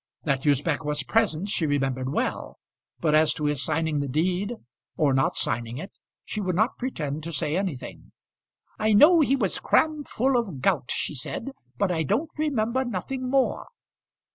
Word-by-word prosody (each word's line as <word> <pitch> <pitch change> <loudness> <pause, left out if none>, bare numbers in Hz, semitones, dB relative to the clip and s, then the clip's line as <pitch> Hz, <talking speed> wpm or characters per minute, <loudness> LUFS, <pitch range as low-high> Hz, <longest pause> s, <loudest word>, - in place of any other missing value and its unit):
That 140 -1 0
Usbech 145 +2 +2
was 150 -1 -1
present 200 -3 +1
she 165 -5 0
remembered 135 -2 -1
well, - - -2 0.4
but 155 -2 +2
as 155 0 +4
to 150 - -3
his 145 -2 0
signing 160 -1 0
the 140 - -2
deed, 180 - 0 0.4
or 145 -3 +3
not 135 0 +1
signing 115 +1 -1
it, 190 +7 -7 0.3
she 210 - -4
would 185 -3 -1
not 220 +6 +1
pretend 155 - -3
to 165 +2 -6
say 155 0 -1
anything. 180 -9 -4 0.7
"I 215 0 +2
know 310 +11 +7
he 275 -3 +3
was 210 -9 0
cram 310 -2 +2
full 260 +2 +1
of 195 - -2
gout," 145 -3 +1
she - - -2
said; 190 - -5 0.3
"but 200 -2 +1
I 165 -2 0
don't 235 - 0
remember 260 -5 0
nothing 255 +3 -4
more." 270 0 +1
170 Hz, 170 wpm, -26 LUFS, 145-230 Hz, 0.7 s, know